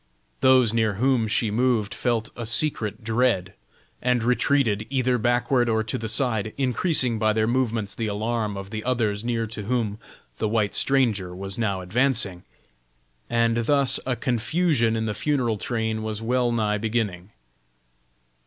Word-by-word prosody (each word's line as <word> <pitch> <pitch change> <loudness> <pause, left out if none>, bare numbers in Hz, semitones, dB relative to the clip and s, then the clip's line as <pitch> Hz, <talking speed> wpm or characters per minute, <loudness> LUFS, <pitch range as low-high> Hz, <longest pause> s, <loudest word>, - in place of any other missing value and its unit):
Those 130 -4 +5
near 110 -2 +1
whom 125 0 +2
she 110 0 0
moved 115 -2 +1
felt 115 -3 -1
a 120 -2 -5
secret 115 -3 -1
dread, 110 -4 +1 0.5
and 125 -2 +1
retreated 120 -3 +1
either 130 -2 +1
backward 120 +1 +2
or 110 -1 +1
to 110 - -3
the 110 0 -3
side, 115 -3 +1
increasing 130 -2 +1
by 110 -1 +2
their 110 0 +1
movements 115 -4 0
the 115 - -3
alarm 105 0 -2
of 100 0 -8
the 110 0 -4
others 110 -5 0
near 115 -1 -1
to 110 -1 -6
whom 110 -1 -2 0.4
the - - 0
white 105 -2 0
stranger 110 -10 +1
was 95 +3 -5
now 100 -5 -1
advancing, 110 -2 0 0.9
and 115 -1 +2
thus 130 +2 +3
a 130 -1 -1
confusion 120 +1 +1
in 110 0 -1
the 105 - -2
funeral 120 -4 0
train 110 +1 -2
was 110 -1 -4
well 120 +1 +1
nigh 105 -2 0
beginning. 105 -5 -2
115 Hz, 155 wpm, -24 LUFS, 105-125 Hz, 0.9 s, Those